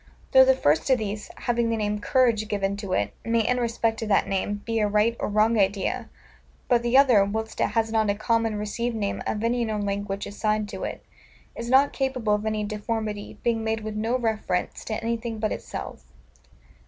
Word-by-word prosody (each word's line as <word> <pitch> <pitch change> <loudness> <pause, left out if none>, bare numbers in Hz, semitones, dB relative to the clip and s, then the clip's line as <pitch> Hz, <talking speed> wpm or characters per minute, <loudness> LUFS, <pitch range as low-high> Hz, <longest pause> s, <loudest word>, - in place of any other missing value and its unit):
Though 260 0 +8
the 265 0 +5
first 155 - +2
of 260 - +5
these, 210 -1 -4
having 235 -1 0
the 230 - 0
name 210 -1 -1
COURAGE 230 -3 +2
given 200 -2 -1
to 200 -3 -4
it, 100 0 0
may, 230 +1 +2
in 250 0 +1
respect 230 -1 0
of 225 - -3
that 200 - +3
name, 205 +1 -2
be 230 -1 0
a 210 - +2
right 210 +3 +2
or - - -1
wrong 215 +2 +3
idea; 195 0 0 0.6
but 240 -1 +3
the 240 +2 +3
other, 250 -7 +6
whilst 220 +3 -3
it - - +3
has 225 0 +2
not 220 -2 +2
a 200 - +2
common 225 +1 0
received 225 +3 -2
name 205 -2 -2
of 210 - -2
any 240 +1 +1
known 215 -2 -2
language 200 0 -3
assigned 215 +1 -1
to 190 -2 -6
it, - - -6 0.5
is 235 0 -5
not 270 +2 +5
capable 255 -6 0
of 210 +1 -1
any 215 -1 -1
deformity, 210 0 -4
being 230 -2 +1
made 220 0 -1
with 215 0 -5
no 225 +4 0
reference 220 -6 -2
to 220 - -3
anything 230 0 -2
but 215 0 -1
itself. - - -6
220 Hz, 205 wpm, -25 LUFS, 205-230 Hz, 0.6 s, Though